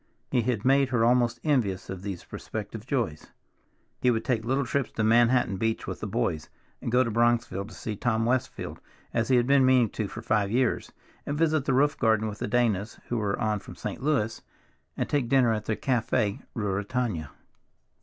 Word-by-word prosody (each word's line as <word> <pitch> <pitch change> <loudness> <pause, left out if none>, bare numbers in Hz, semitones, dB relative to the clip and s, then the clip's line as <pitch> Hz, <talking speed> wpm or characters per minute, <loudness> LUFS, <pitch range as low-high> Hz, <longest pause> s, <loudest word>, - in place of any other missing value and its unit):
He 125 - +3
had 115 -2 -1
made 135 0 +4
her 120 -3 +2
almost 120 -1 +3
envious 115 - +1
of 95 -1 -6
these 95 -3 -5
prospective 110 +2 -7
joys. 120 - -2 0.7
He 125 - +4
would 115 -2 0
take 120 -5 0
little 135 +3 0
trips 135 0 -1
to 110 - -1
Manhattan 120 -1 +4
Beach 115 +3 -1
with - - -5
"the - - -4
boys" 75 +4 -1 0.3
and - - -3
go 125 +2 +5
to 115 - -2
Bronxville 115 -3 +1
to - - -12
see 110 - -5
Tom 115 +1 0
Westfield, 130 +1 -2 0.3
as 115 -1 +1
he 130 - +4
had 120 -1 +4
been 135 +1 +5
meaning 130 -4 +4
to 110 - -3
for 110 +3 -8
five 105 -3 +1
years, 125 +2 0 0.3
and 145 - -3
visit 155 -3 +2
the 135 - +1
roof 145 +3 +2
garden 110 -1 +2
with 105 -1 -6
the - - -2
Danas, 110 -3 0
who 120 - 0
were 100 -2 -1
on 110 -2 0
from - - -11
St. - - -5
Louis, 130 -6 0 0.6
and - - -1
take 140 -5 0
dinner 125 -4 +4
at 105 -1 -3
the 110 - 0
Café 115 -4 0
Ruritania. 105 - -2
115 Hz, 195 wpm, -27 LUFS, 105-130 Hz, 0.7 s, go